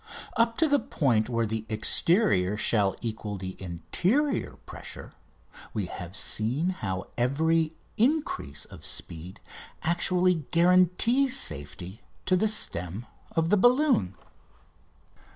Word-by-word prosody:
Up 230 -1 +2
to 320 - +4
the 285 -1 +3
point 120 - 0
where 115 -1 0
the 110 0 -3
exterior 110 - +2
shall 105 -3 +1
equal 110 -3 -4
the 95 0 -6
interior 95 - -1
pressure - - -9 0.6
we 105 -3 -1
have 90 +2 -8
seen 130 +12 -1
how 95 - -4
every 160 +5 +1 0.2
increase 235 - 0
of - - -13
speed 85 +3 -6 0.4
actually 175 -1 +1
guarantees 185 +10 +4
safety 90 - -3 0.2
to 185 - +3
the 210 +4 +2
stem 95 - 0 0.3
of 165 0 +1
the 210 - +5
balloon. 245 - +3
140 Hz, 115 wpm, -27 LUFS, -, 0.6 s, the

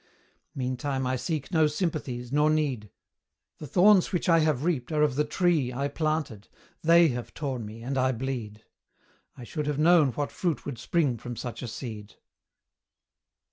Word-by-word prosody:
Meantime 130 +1 -2
I 130 0 0
seek 155 +3 -3
no 160 -3 +4
sympathies, 145 -7 -3
nor 150 +2 +3
need; 140 -9 0 0.7
The 150 - -7
thorns 190 +5 +5
which 180 - -1
I 165 -2 +5
have 155 -4 +1
reaped 155 -6 -1
are 150 -1 +2
of 150 -3 +2
the 150 - +2
tree 155 -4 +1
I 140 +3 -2
planted, 150 -8 -2 0.3
they 170 0 +6
have 125 -2 -5
torn 130 -7 -4
me, 110 +2 -10
and 135 +2 -2
I 130 0 +2
bleed: 115 -4 -5 0.7
I 125 - -9
should 150 +4 -4
have 150 -2 -1
known 160 -2 +5
what 145 +2 -3
fruit 170 -5 -2
would 140 -5 -5
spring 140 -8 0
from 120 +2 -6
such 120 +1 -6
a 125 - -5
seed. 110 -3 -7
140 Hz, 170 wpm, -27 LUFS, 125-155 Hz, 0.7 s, they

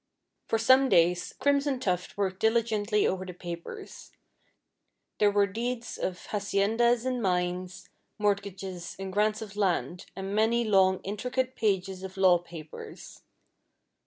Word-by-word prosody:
For 225 - +1
some 260 +4 +5
days 175 -1 +3
Crimson 280 -1 +2
Tuft 180 -6 -2
worked 190 -2 -1
diligently 220 -2 +2
over 185 0 0
the 180 -2 -8
papers. 170 -1 -8 1.1
There 210 - +5
were 205 0 +3
deeds 235 +4 -4
of 180 -1 -3
haciendas 220 +4 +1
and 255 -1 -1
mines, 180 -1 -2 0.3
mortgages, 195 -4 -2
and 190 0 -6
grants 215 +2 +1
of 205 -2 -11
land, 180 -3 -1
and 195 +1 -5
many 225 +3 +2
long, 190 -3 +3
intricate 250 +6 -2
pages 190 -3 0
of 190 0 -8
law 185 -2 +5
papers. 165 -3 -10
200 Hz, 130 wpm, -28 LUFS, 185-225 Hz, 1.1 s, some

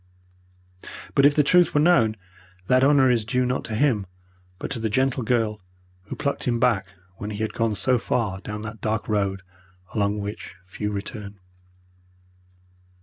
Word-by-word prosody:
But 140 0 +6
if 145 - +1
the 150 - +4
truth 175 +3 +4
were - - +5
known 120 -10 +4 0.5
that 130 +5 +3
honour 135 -2 +5
is 115 -3 +1
due 125 +3 0
not 125 +1 -1
to 110 - -4
him, 110 -6 +1 0.5
but - - -6
to 130 - -3
the 110 0 -1
gentle 130 +4 +1
girl 110 -3 0 0.4
who - - -6
plucked 140 - -2
him 120 -1 0
back 110 -7 +2 0.3
when 105 - -5
he 105 - -5
had 110 - -3
gone 115 -2 0
so 125 +6 +2
far 105 -5 -1
down 105 0 -6
that 110 0 -8
dark 110 0 -1
road 100 -3 -1 0.5
along 105 -1 0
which 105 0 -6
few 105 +3 -4
return. 100 0 -6
110 Hz, 165 wpm, -24 LUFS, 105-130 Hz, 0.5 s, But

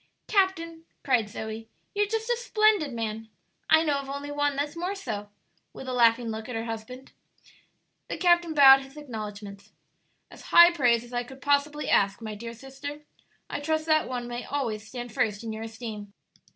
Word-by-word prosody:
"Captain," 335 -5 0 0.2
cried 240 -6 +2
Zoe, 220 +1 -7 0.2
"you're 415 0 +1
just 445 +1 -2
a 485 - +2
splendid 430 - +2
man! 225 -1 -4 0.4
I 315 - +6
know 290 -3 +1
of 275 -1 -8
only 280 +1 -5
one 290 -1 0
that's 290 +2 -2
more 360 +4 -3
so," 210 - -5 0.4
with 265 - -9
a 255 - -3
laughing 235 -1 +3
look 220 +1 -5
at 250 - -4
her 225 - -2
husband. 230 +4 -7 1.0
The - - -4
captain 345 -2 +3
bowed 270 -2 +9
his 270 +2 -13
acknowledgments. 210 -6 -8 0.6
"As - - -13
high 345 +1 +8
praise 245 -8 +2
as 240 +1 -14
I 245 0 -1
could 265 +2 -12
possibly 285 +1 +1
ask, 200 +1 +2
my 220 -2 -6
dear 230 +2 -7
sister. 270 +4 -8 0.5
I - - -4
trust 315 +1 -1
that 310 -3 +2
one 245 -1 -4
may 240 0 -5
always 225 -7 -3
stand 245 -1 -7
first 210 0 0
in 225 -1 -4
your 220 - -6
esteem." 220 -3 -7
260 Hz, 180 wpm, -27 LUFS, 225-305 Hz, 1.0 s, bowed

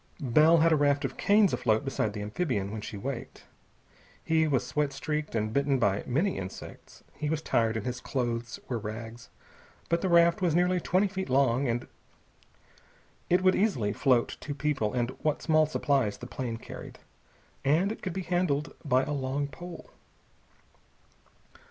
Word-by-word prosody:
Bell 155 +4 +5
had 165 +1 +4
a - - +5
raft 145 -1 +2
of 130 - -4
canes 205 -1 +4
afloat 110 +2 +1
beside 115 -6 -1
the 105 -1 -5
amphibian 105 - -2
when 110 0 -5
she 105 - -7
waked. 125 +3 -6 0.8
He 160 -1 +2
was 135 -5 +1
sweat 150 -2 -1
streaked 150 -1 -3
and 110 0 -1
bitten 140 0 +2
by 100 -4 +1
many 165 - 0
insects. 95 0 -9
He 150 - -3
was 160 0 -1
tired, 115 -1 +1
and 110 - -5
his 125 0 -4
clothes 120 -3 -3
were 120 -3 -2
rags. 115 +2 -7 0.6
But 170 0 +1
the 190 - 0
raft 170 0 +5
was 170 -4 +2
nearly 180 +1 +3
twenty 185 +4 +2
feet 190 -4 -5
long, 130 0 +2 1.6
it 180 +1 +3
would 185 0 +5
easily 130 - +1
float 125 0 +2
two 145 - -5
persons 135 -6 -1
and 120 0 0
what 155 -2 -1
small 155 -1 +4
supplies 140 -8 0
the 125 - -9
plane 120 -2 -4
carried, - - -10 0.7
and 160 +9 +2
it 220 - -7
could 185 - -4
be 190 - -3
handled 170 -4 0
by 130 -2 +2
a 145 - -4
long 140 0 -1
pole. 175 +4 -10
140 Hz, 165 wpm, -28 LUFS, 120-165 Hz, 1.6 s, Bell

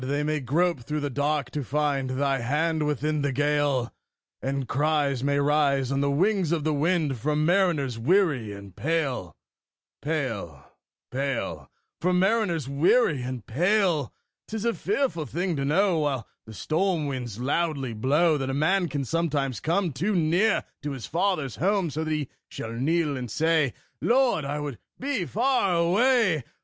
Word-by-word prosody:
they 145 +3 -1
may 155 0 0
grope 160 +5 +1
through 150 +6 -3
the 145 -1 -3
dark 145 -1 -1
to 145 0 -3
find 140 0 0
Thy 135 +1 0
hand 150 +5 0
within 150 +1 0
the 140 -1 0
gale; 145 -2 +1 0.5
And 135 -1 -2
cries 145 -2 +1
may 140 0 +1
rise 140 -2 +2
on 135 0 +1
the 140 - +1
wings 185 +3 +1
of 165 -3 0
the 155 0 +1
wind 150 -3 +1
From 150 +5 0
mariners 165 - +2
weary 140 - +2
and 100 -2 -10
pale, 135 - -1 0.7
pale, 115 - -3 0.5
pale 135 -1 -3 0.3
From 180 +1 +2
mariners 190 - +1
weary 150 - +3
and 125 -3 -5
pale! 175 - +1 0.4
'Tis 220 0 -4
a 235 - +2
fearful 260 - -1
thing 175 +1 -1
to 140 - -2
know, 175 +3 +2
While 140 -6 -1 0.2
the 110 - -9
storm 170 - 0
winds 125 -6 -4
loudly 140 -1 -1
blow, 150 +8 +2
That 135 -1 -2
a 135 - -1
man 175 +5 +2
can 140 -2 -3
sometimes 145 -4 -1
come 170 0 0
Too 185 +11 -1
near 175 +6 +2 0.2
to 145 -1 -3
his 130 -4 -6
father's 165 - -1
home; 190 -1 +1
So 155 +3 -2
that 155 - -2
he 150 -3 -1 0.2
shall 115 - -6
kneel 150 +4 0
and 125 -2 -5
say, 155 0 +1 0.3
"Lord, 245 - +2
I 145 +2 -2
would 145 -5 -5 0.2
be 260 -8 -1
far 225 -3 +1
away!" 185 - +3
150 Hz, 160 wpm, -26 LUFS, 135-170 Hz, 0.7 s, weary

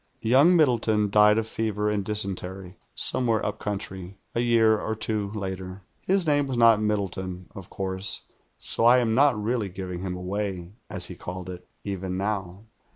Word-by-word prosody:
Young 140 +10 +5
Middleton 115 - +2
died 105 +1 +5
of 110 0 -1
fever 105 -2 -2
and 105 -1 0
dysentery, 95 -3 -3 0.2
somewhere 115 -4 +1
upcountry, 95 -2 -5 0.2
a - - -1
year 115 -2 +3
or 110 - -3
two 110 -2 -2
later. 95 -2 -6 0.2
His 190 -1 +1
name 145 -2 +2
was 130 -2 -3
not 115 -2 +5
Middleton, 95 -4 -3
of 95 -2 -10
course; 95 +1 -3 0.4
so - - +3
I 120 +2 +7
am 120 -3 +1
not 135 -2 +4
really 110 -1 -1
"giving 90 -1 -6
him 90 0 -4
away," 95 -1 -4 0.2
as 95 -4 0
he 90 - -5
called 90 +1 -7
it, 90 0 -11 0.2
even 95 -2 -4
now. 95 -1 -3
105 Hz, 160 wpm, -25 LUFS, 95-110 Hz, 0.4 s, I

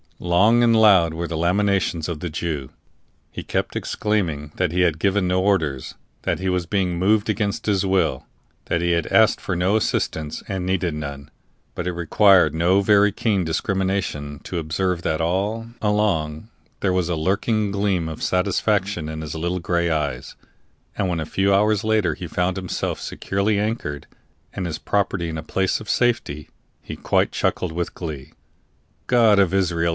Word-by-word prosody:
Long 100 +7 +3
and 115 -1 +4
loud 95 -7 +5
were 85 +1 -3
the 85 0 -4
lamentations 90 -1 +1
of 85 -4 -4
the 90 - -4
Jew. 75 -4 -4 0.6
He - - -6
kept - - -2
exclaiming 85 -9 -2
that 90 -3 0
he 90 +1 +1
had 85 -3 +2
given 100 0 +1
no 90 +1 +1
orders, 80 -9 0 0.3
that - - 0
he 95 - -3
was 90 -2 -1
being 90 -2 0
moved 105 +4 +2
against 105 -1 -1
his 100 -2 +1
will, 95 0 +1 0.4
that 85 - -1
he 85 0 +1
had 85 -2 0
asked 110 0 +4
for 95 - -2
no 90 +4 +1
assistance, 80 -7 -1
and 95 -3 -3
needed 90 -3 0
none; 70 -2 -6 0.4
but 85 - -4
it 90 - -1
required 90 +1 +4
no 90 +4 +3
very 105 0 +4
keen 100 -2 0
discrimination 90 -4 -2
to 90 - -5
observe 85 +3 -1
that 80 -1 -1
all 100 +7 -1
along 105 -5 0 0.3
there 95 -2 +1
was 90 -2 0
a 85 - 0
lurking 100 +5 0
gleam 100 -4 0
of 80 - -7
satisfaction 95 -2 0
in 80 0 -5
his 75 0 -6
little 85 +3 -2
gray 85 0 0
eyes, 75 -3 -2 0.6
and 95 - -1
when, 85 -2 -1
a 80 - -3
few 95 +5 +1
hours 105 +1 +2
later, 110 -6 +1
he 90 - -7
found 90 +3 -1
himself 95 -2 -3
securely 100 +2 -1
anchored, 105 - -3 0.5
and 95 - -4
his 80 -1 -4
property 95 -4 -1
in 80 - -4
a 80 - -5
place 95 +4 0
of 110 - -10
safety, 115 - 0 0.3
he - - -7
quite - - +1
chuckled 90 - -1
with 85 +1 -4
glee. 75 -6 -7 0.7
"God 115 -4 +5
of 95 -2 +3
Israel!" 85 -3 +1
90 Hz, 175 wpm, -22 LUFS, 80-100 Hz, 0.7 s, loud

